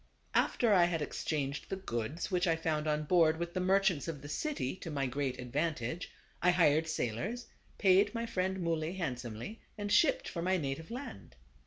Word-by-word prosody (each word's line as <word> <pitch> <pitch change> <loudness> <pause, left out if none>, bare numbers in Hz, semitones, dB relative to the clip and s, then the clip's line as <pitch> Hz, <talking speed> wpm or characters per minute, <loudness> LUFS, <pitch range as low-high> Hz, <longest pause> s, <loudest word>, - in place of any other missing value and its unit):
After 230 -4 +3
I 180 -3 +6
had 165 -3 0
ex - - -5
changed 140 -2 -2
the - - -1
goods 155 - -3
which 180 0 +2
I 165 - +3
found 155 -1 -1
on 150 0 +1
board 160 0 +4
with 170 +1 -4
the 185 - -1
merchants 190 -4 +2
of 150 -4 -5
the - - -6
city 230 - -2
to 170 - -7
my 140 -3 -1
great 135 0 -2
advantage, 145 +3 -2 0.3
I 180 - +4
hired 160 -3 +4
sailors, 160 - -2 0.3
paid 200 +3 +4
my 230 0 -1
friend 190 -4 -1
Muley 165 -1 -1
hand 170 -10 -2
somely, 120 - -7 0.2
and 205 -1 -3
shipped 275 +8 +4
for 170 - -4
my 185 +2 +2
native 155 +1 -4
land. 165 - -8
165 Hz, 190 wpm, -33 LUFS, 145-190 Hz, 0.3 s, I